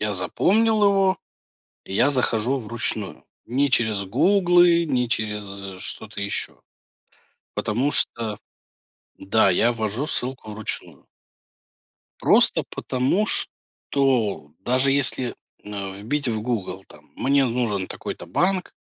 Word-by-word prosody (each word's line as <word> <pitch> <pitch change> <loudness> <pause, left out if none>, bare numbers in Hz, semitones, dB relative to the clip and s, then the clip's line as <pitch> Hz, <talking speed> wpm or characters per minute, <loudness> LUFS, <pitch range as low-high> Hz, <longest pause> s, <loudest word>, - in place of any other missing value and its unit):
Я 105 0 0
запомнил 210 - +2
его 195 -2 +3 0.7
и 95 - -6
я 140 +7 +4
захожу 125 0 +1
вручную, 110 -3 -3 0.2
не 135 +3 +1
через 110 -4 +1
"Гуглы", 175 - +4
не 125 -5 0
через 100 -4 -4
что-то 105 -2 -6
еще. 100 0 -3 0.9
Потому 125 +7 0
что 115 -6 0 0.8
Да, 100 +1 +3
я 115 +6 +3
ввожу 110 +5 -2
ссылку 125 -6 -3
вручную. 110 0 -6 1.1
Просто - - +4
потому 130 +12 0
что, 125 - 0
даже 130 +6 +1
если 130 -3 0 0.3
на 100 -2 -5
вбить 125 +8 -3
в 110 -2 -1
"Гугл" 105 -4 -3
там: - - -18
"Мне 140 +1 +3
нужен 115 -6 -1
такой-то - - -6
банк" 180 - 0
120 Hz, 110 wpm, -23 LUFS, 105-140 Hz, 1.1 s, я